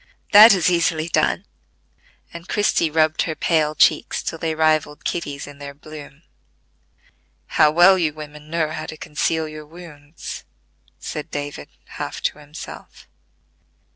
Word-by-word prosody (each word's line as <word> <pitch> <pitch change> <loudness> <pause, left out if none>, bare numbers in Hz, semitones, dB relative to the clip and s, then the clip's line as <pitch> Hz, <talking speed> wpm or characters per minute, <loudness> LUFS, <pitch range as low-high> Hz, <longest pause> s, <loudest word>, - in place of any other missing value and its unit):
"That 215 +3 +10
is 175 -4 +1
easily 170 -2 +1
done;" - - +1 0.9
and 170 +1 -10
Christie 205 -6 +1
rubbed 155 0 +2
her 160 - -2
pale 155 -2 +1
cheeks 155 - +2
till 165 - -4
they 160 -1 -2
rivalled 155 -2 +1
Kitty's 145 -4 -3
in 145 0 -12
their 140 0 -8
bloom. 150 0 -12 1.2
"How 150 - +4
well 175 +4 +6
you 160 -3 +1
women 150 0 -11
know 160 -1 -1
how 160 - -5
to 155 - -8
conceal 160 +2 -1
your 155 -1 -10
wounds," 160 -2 -10 0.5
said 150 - -6
David, 145 0 -6 0.2
half - - -6
to - - -1
himself. 150 +1 -11
155 Hz, 140 wpm, -21 LUFS, 150-165 Hz, 1.2 s, That